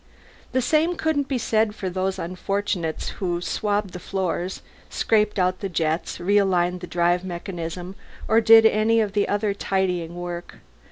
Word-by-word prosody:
The 260 - +1
same 320 +6 +2
couldn't 310 -4 0
be 270 - -1
said 220 -2 +1
for 190 - -4
the 185 +1 -2
unfortunates 185 -1 -2
who 175 -2 0
swabbed 205 +2 -1
the 180 - -6
floors, 185 -1 -3 0.3
scraped 215 -1 +1
out 185 -1 +1
the 195 - -3
jets, 160 -1 -1
realigned 180 -2 +2
the 180 - -8
drive 175 +1 +1
mechanism, 175 0 -6 0.3
or 225 +1 +4
did 225 0 +8
any 220 +1 +4 0.3
other 205 0 0
tidying 180 -4 -1
work. 175 0 -6
190 Hz, 145 wpm, -23 LUFS, 175-215 Hz, 0.3 s, did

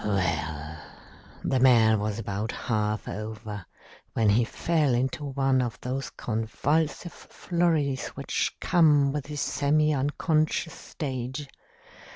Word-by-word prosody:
"Well, 80 -6 -1 0.7
the 130 - +1
man 115 -4 +5
was 105 0 -2
about 105 0 -3
half 105 -2 -1
over 110 -2 -6 0.5
when 110 -2 +3
he 110 +4 +4
fell 150 -1 +1
into 130 +4 -1
one 135 -1 +1
of 120 -2 -3
those 130 +1 -3
convulsive 145 +9 -1
flurries 160 -6 -1
which - - -2
come 150 -5 +4
with 145 -1 -3
the 150 - -7
semi 150 +1 +2
unconscious 155 +3 0
stage. 135 0 -5
130 Hz, 115 wpm, -27 LUFS, 110-150 Hz, 0.7 s, man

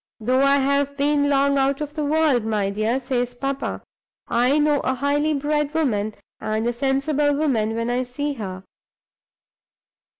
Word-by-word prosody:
'Though 255 +4 +1
I 275 0 +4
have 280 +1 0
been 285 0 +2
long 280 0 +3
out 275 0 +1
of 295 -1 -5
the 305 -1 -3
world, 295 -5 +2
my 210 -3 -1
dear,' 215 +5 0
says 245 -2 -2
papa, 275 +2 -3 0.5
'I 250 +4 +2
know 295 -1 +3
a 260 - -1
highly 290 +3 +1
bred 295 +1 -1
woman 215 -9 0 0.2
and 215 +1 -2
a 240 - 0
sensible 275 +3 +1
woman 230 -8 0
when 230 +1 -1
I 250 +1 0
see 285 +4 -3
her. 190 -6 -7
275 Hz, 160 wpm, -22 LUFS, 240-290 Hz, 0.5 s, I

